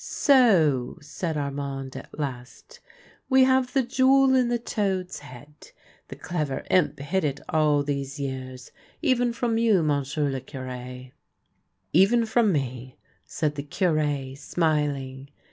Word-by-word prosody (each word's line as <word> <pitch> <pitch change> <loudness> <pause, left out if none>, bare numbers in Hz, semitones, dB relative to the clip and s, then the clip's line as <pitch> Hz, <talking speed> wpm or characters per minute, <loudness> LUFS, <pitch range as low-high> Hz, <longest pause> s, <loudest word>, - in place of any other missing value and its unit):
" - - -12
So," 180 - +3
said 155 +2 -4
Armand 140 -2 -4
at 135 - -10
last, 140 - -7 0.2
" - - -29
we 265 0 +6
have 260 -1 +2
the 270 -2 +2
jewel 265 +2 +4
in 255 -2 +3
the 240 - +1
toad's 195 -5 -2
head. 145 +2 -13 0.5
The - - -9
clever 150 -6 -3
imp 150 -5 +2
hid 170 +7 -2
it 145 -1 -1
all 150 -2 +2
these 140 0 -4
years 130 -2 -6 0.2
— - - -29
even 245 -5 +2
from 235 -1 -1
you, 215 -7 +3
monsieur 145 0 0
le 135 -1 -4
Cure." 125 -1 -8 0.4
" - - -48
Even 230 +3 +2
from 225 -1 +2
me," 130 -4 -4 0.3
said 150 -2 -1
the 145 - -5
Cure, 145 -4 -1
smiling. 140 -3 -2
150 Hz, 145 wpm, -25 LUFS, 135-220 Hz, 0.5 s, we